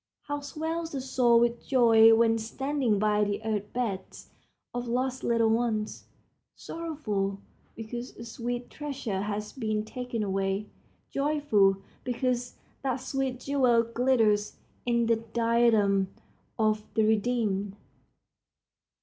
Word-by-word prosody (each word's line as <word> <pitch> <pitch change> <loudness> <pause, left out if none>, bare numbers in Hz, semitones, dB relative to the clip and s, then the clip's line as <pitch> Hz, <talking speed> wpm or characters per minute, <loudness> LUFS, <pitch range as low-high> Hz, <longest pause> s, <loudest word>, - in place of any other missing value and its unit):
How 290 0 -3
swells 320 +3 -4
the 275 - -2
soul 250 -3 +3
with 235 0 +1
joy 225 -3 +6
when 225 0 +3
standing 260 0 -1
by 210 0 +2
the 205 0 -1
earth 210 -2 -2
beds 210 -7 -4 0.4
of 245 0 -3
lost 255 +2 -1
little 230 -1 +3
ones, 225 -2 -1 0.5
sorrowful 215 -13 -3 0.4
because 240 +2 -6
a 230 - -8
sweet 240 +1 -4
treasure 275 -10 -4
has 210 +1 -4
been 215 -4 -2
taken 245 -1 -4
away, 195 +1 -1 0.5
joyful 275 -10 +2 0.2
because 245 0 -1 0.3
that 265 -2 0
sweet 260 0 -3
jewel 255 -5 +3
glitters 230 -3 +2 0.3
in 235 -1 +2
the 230 0 +3
diadem 225 -3 +2 0.5
of 215 -1 +1
the 220 - +3
redeemed. 215 -3 +1
230 Hz, 115 wpm, -28 LUFS, 215-255 Hz, 0.5 s, joy